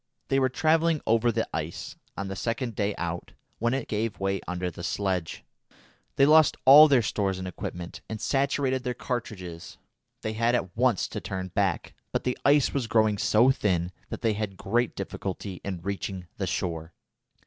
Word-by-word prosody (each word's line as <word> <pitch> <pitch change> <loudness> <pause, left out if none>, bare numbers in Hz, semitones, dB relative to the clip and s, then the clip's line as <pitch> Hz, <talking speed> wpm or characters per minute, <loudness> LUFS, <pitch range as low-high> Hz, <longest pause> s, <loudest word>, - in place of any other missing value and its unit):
They 135 - +3
were 130 -1 +3
travelling 160 +3 +2
over 115 +1 +3
the - - -1
ice, - - -5 0.2
on 100 - -3
the 95 - -4
second 115 +3 -2
day 100 0 -1
out, 85 0 -4 0.3
when 120 +3 +1
it 135 - -3
gave 110 0 -2
way 95 0 -1
under 90 0 -2
the 85 - -9
sledge. 95 -2 -2 0.7
They 135 - +5
lost 155 +1 +6
all 150 +4 +10
their 135 -5 +4
stores 100 -2 -1
and 95 0 -5
equipment, 90 -1 -6
and 110 -1 -4
saturated 135 0 +1
their 125 -2 -2
cartridges. 95 -9 -5 0.5
They 110 - -2
had 115 +2 +2
at 95 -7 -2
once 120 -3 +2
to - - -5
turn 95 -1 -4
back, 95 -2 -1 0.2
but - - -1
the 125 - 0
ice 145 -1 +4
was 135 -5 -1
growing 110 -3 +2
so 120 +5 +5
thin 90 -8 0 0.2
that - - -6
they 115 -2 +2
had 105 -2 -4
great 120 +6 0
difficulty 95 -1 -5
in 95 -4 -5
reaching 95 -1 -4
the 95 - -2
shore. 80 -3 -3
105 Hz, 180 wpm, -27 LUFS, 95-125 Hz, 0.7 s, all